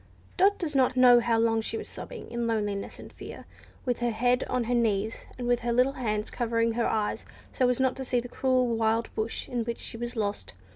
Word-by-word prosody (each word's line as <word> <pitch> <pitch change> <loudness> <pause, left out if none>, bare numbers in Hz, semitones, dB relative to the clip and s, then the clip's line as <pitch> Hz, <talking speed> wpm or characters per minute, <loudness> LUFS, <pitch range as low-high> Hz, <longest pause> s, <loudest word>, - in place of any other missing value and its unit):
Dot 395 +2 +4
does 325 -4 -3
not 260 -2 +2
know 250 -1 +8
how 230 -1 +1
long 225 0 +2
she 225 - -3
was - - -6
sobbing - - -9
in 235 0 -2
loneliness 205 -3 -2
and - - -12
fear, - - -10 0.4
with 245 -2 0
her 240 0 +1
head 245 +3 +1
on 250 -1 -1
her 240 +2 -1
knees, 220 -2 0
and 245 -1 -4
with 245 -1 +3
her 240 0 -2
little 250 +3 +3
hands 215 -5 -2
covering 230 -1 0
her 235 +1 0
eyes 210 -1 -1 0.3
so 255 -1 +2
as 250 - +1
not 260 -1 +2
to 265 - -4
see 250 -1 0
the 245 - -6
cruel 255 0 +1
wild 225 -1 0
bush 220 +1 -3
in 240 -2 -2
which 235 0 -4
she - - -6
was 240 +1 -5
lost. 200 - -3
235 Hz, 230 wpm, -28 LUFS, 225-250 Hz, 0.4 s, know